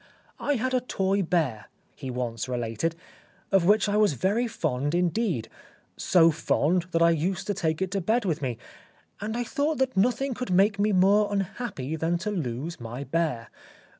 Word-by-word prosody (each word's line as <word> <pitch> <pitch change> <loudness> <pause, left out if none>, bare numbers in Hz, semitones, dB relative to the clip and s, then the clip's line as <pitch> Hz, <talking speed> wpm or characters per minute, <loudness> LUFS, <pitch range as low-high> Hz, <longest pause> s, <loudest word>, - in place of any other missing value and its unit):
" - - -33
I 290 - +4
had 255 +2 -1
a 255 - +2
toy 195 -4 0
bear," 155 - -1 0.3
he 135 - -7
once 125 -1 -3
related, 120 +6 -2 0.3
" - - -33
of 195 -3 +4
which 210 +3 +4
I 205 0 +1
was 210 -6 +4
very 205 - 0
fond 145 - -1
indeed, 175 - 0 0.5
so 165 -3 +4
fond 165 +2 +1
that 170 -1 +2
I 170 - +6
used 170 +4 -1
to 205 - -1
take 160 -2 -1
it 185 - -4
to 195 0 -1
bed 225 +6 +1
with 165 -6 -1
me, 125 -4 -2 0.6
and 220 +3 -3
I 245 - 0
thought 295 +5 -1
that 265 -1 0
nothing 250 +6 +1
could 250 +1 -5
make 200 +3 +3
me 210 +1 +2
more 200 +2 +4
unhappy 195 - -3
than 165 +2 0
to 210 +5 -3
lose 155 - -4
my 120 +3 -6
bear. 140 -5 -1
180 Hz, 190 wpm, -26 LUFS, 150-210 Hz, 0.6 s, I